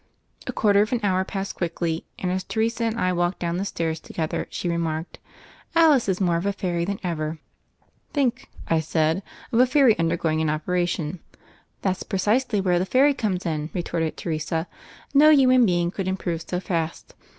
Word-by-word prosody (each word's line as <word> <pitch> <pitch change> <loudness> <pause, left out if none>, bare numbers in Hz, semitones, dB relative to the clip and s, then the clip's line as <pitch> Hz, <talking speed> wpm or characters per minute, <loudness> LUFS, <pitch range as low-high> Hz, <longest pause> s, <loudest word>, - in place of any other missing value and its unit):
A - - -1
quarter 205 -2 +3
of 215 - 0
an 245 - +1
hour 190 -2 +2
passed 195 +1 -4
quickly, 165 -1 -3
and 180 - -2
as 185 0 -1
Teresa 230 +2 -1
and 225 +1 -1
I 185 -3 +1
walked 175 +1 0
down 170 0 -2
the 195 - -2
stairs 165 -4 -2
to - - -13
gether 160 -2 -2
she - - -4
remarked: 165 -1 -2 0.6
"Alice 305 -9 +5
is 185 - 0
more 175 -3 +2
of 175 +4 -2
a 200 - +1
fairy 180 -4 -2
than 200 +1 -3
ever." 160 -3 -2 0.7
"Think," 255 -4 0 0.2
I 165 - +2
said, 160 +2 +1 0.3
"of 230 - +2
a 255 - +6
fairy 255 -4 +5
undergoing 165 -1 +1
an 160 - +1
operation." 170 +1 -1 0.6
"That's 190 -2 0
precisely 215 +3 +1
where 180 -2 +2
the 185 - 0
fairy 275 +5 +4
comes 195 -8 -2
in," 155 -2 -2
retorted 165 -2 -2
Teresa. 160 +1 -2 0.5
"No 295 +2 +7
human 255 -5 +6
being 175 -1 +1
could 190 -1 -4
im 190 0 0
prove 170 -3 -3
so 180 - -1
fast. 165 -3 -3
180 Hz, 185 wpm, -24 LUFS, 165-210 Hz, 0.7 s, No